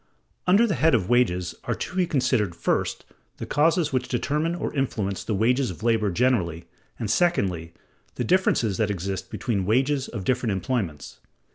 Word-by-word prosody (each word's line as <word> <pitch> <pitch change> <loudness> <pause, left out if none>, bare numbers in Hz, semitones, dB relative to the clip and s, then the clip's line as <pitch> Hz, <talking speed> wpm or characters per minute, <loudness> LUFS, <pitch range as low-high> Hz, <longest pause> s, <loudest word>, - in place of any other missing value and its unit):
Under 200 +6 +5
the 210 - 0
head 160 -3 +3
of 100 -3 -1
Wages 90 -8 +2
are - - -1
to - - -6
be 185 -2 +2
considered, 105 - +1
first, 85 - -1 0.3
the - - -5
causes 160 +1 +2
which 130 0 0
determine 150 +7 -1
or - - -4
influence 110 -8 -2
the 110 - -2
wages 125 +6 +2
of 95 +4 -8
labor 110 -3 +2
generally, 90 -7 0 0.3
and 110 - -3
secondly, 95 - +1 0.4
the - - -2
differences 125 - +2
that 110 -2 +1
exist 95 -1 -4
between 115 -6 -2
the 95 - -2
wages 130 +6 +1
of 100 - -6
different 120 0 0
employments. 95 - -3
115 Hz, 170 wpm, -25 LUFS, 95-140 Hz, 0.4 s, Under